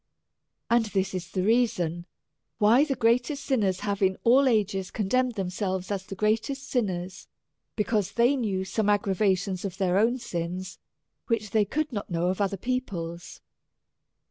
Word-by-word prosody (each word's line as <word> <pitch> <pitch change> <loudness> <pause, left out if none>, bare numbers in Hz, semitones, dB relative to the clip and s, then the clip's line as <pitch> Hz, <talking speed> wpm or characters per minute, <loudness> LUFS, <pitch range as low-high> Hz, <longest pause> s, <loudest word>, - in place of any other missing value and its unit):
And 235 -1 +3
this 195 -2 -1
is 180 -1 -4
the 185 -1 -1
reason 185 -7 +1 0.5
why 230 +7 +5
the 275 -3 -1
greatest 245 +5 +1
saints 200 -9 +1
have 200 -1 -2
in 190 -1 +2
all 265 +4 +5
ages 200 -5 +1
condemned 245 +4 0
themselves 190 -1 -3
as 190 -2 -3
the 195 - -6
greatest 225 +7 -1
sin 245 -5 +1
ners, 180 0 -6 0.5
because 210 -3 0
they 240 +4 +3
knew 200 -7 -1
some 210 +2 0
aggravations 195 -2 +1
of 190 -2 -5
their 190 -1 +2
own 235 +4 +3
sins, 180 -3 -5 0.5
which 215 -3 -1
they 215 -2 +3
could 300 +6 -2
not 205 - -4
know 175 0 0
of 190 +2 -1
other 195 0 0
peo 255 +6 0
ple's. 170 -8 -7
205 Hz, 160 wpm, -27 LUFS, 185-235 Hz, 0.5 s, why